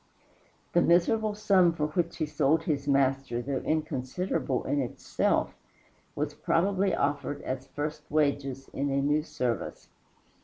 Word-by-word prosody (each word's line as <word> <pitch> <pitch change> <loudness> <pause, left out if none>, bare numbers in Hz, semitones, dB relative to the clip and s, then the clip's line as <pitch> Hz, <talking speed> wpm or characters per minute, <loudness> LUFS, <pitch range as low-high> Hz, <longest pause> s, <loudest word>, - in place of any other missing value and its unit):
The 175 - +5
miserable 210 +6 +3
sum 195 -5 +4
for 150 -2 -1
which 170 +2 -1
he 155 - 0
sold 150 +1 +2
his 145 -3 -1
Master, 135 -3 +2
though 135 +2 -2
inconsiderable 150 -1 -1
in 145 - 0
itself, 125 - 0 0.6
was - - -2
probably 190 +1 +1
offered 145 0 -1
as 130 +1 -4
first 150 +2 -5
wages 140 -3 0
in 140 +1 -2
a 135 0 +1
new 145 +2 +2
service. 125 -6 -3
145 Hz, 130 wpm, -28 LUFS, 135-170 Hz, 0.6 s, The